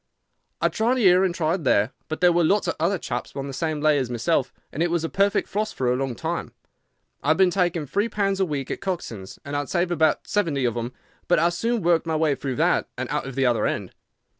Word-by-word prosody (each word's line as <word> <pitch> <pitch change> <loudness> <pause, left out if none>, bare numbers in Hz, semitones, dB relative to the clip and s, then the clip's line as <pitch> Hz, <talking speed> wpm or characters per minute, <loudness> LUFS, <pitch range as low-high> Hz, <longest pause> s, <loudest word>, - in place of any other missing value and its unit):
I - - +2
tried 235 +4 +1
here 185 -5 +5
and 180 -2 0
tried 165 0 0
there, 105 -3 +3 0.2
but 155 +1 -5
there 180 -1 +6
were 175 0 +3
lots 200 +6 +2
of - - 0
other 180 +5 +1
chaps - - -5
on 135 - -3
the 140 - -6
same 155 +2 -2
lay 150 -1 +4
as 130 -3 -2
myself, 125 +3 0 0.2
and 155 - -4
it 170 - +2
was 170 -1 0
a 165 - -2
perfect 200 +1 +1
frost 215 +2 -2
for 125 -2 +1
a - - +2
long 130 -2 -2
time. - - -4 0.7
I - - -6
had 155 +1 +4
been 190 -2 +4
taking 175 -4 0
three 205 - 0
pounds 195 -2 0
a 190 - +3
week 140 -5 -3
at - - -4
Coxon's, 145 - -5
and 140 +1 -4
I - - +1
had 145 - -5
saved 175 0 0
about 160 -3 +2
seventy 160 -10 0
of 120 - +1
them, 120 +1 -3 0.4
but 175 - +4
I 170 - +4
soon 225 +5 -1
worked 170 -1 +2
my 160 - 0
way 155 -2 +2
through 135 -2 -4
that - - +2
and - - -4
out - - -2
at 135 - -7
the 135 -1 +2
other 120 -2 +2
end. - - -3
160 Hz, 255 wpm, -24 LUFS, 135-185 Hz, 0.7 s, there